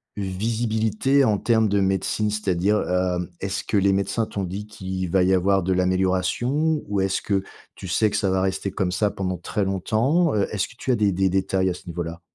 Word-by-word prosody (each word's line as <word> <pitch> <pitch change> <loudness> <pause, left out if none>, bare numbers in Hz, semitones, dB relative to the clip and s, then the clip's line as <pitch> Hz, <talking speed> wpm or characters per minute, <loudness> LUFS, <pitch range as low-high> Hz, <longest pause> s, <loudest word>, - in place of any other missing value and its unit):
une 100 - -3
visibilité 110 +6 +1
en 110 -5 +3
termes 110 +1 +2
de 100 0 +2
médecine. 95 +2 0
C'est-à-dire, 105 0 +1
hem, 90 -1 0
est-ce 95 0 -3
que 105 - 0
les 100 0 +3
médecins 100 +4 0
t'ont 100 -2 -4
dit 95 +3 -5
qu'il 95 -4 -5
va 95 - +3
y 90 +1 +3
avoir 95 +2 +2
de 95 +2 -1
l'amélioration? 95 - +1
Ou 100 -1 0
est-ce 95 0 0
que 100 -2 0 0.3
tu 95 - -9
sais 110 +4 +2
que 105 - -2
ça 100 -2 +1
va 95 0 +1
rester 95 +1 -1
comme 95 -2 -1
ça 100 +2 +1
pendant 95 -2 -3
très 100 +4 -2
longtemps? 115 - +1
Heu, 100 - +1
est-ce 105 -2 -1
que - - -16
tu - - -6
as - - +3
des 105 -3 +2
des 95 +1 +1
détails 95 0 +1
à - - -1
ce - - -13
niveau-là? 85 0 -5
95 Hz, 220 wpm, -23 LUFS, 95-105 Hz, 0.3 s, en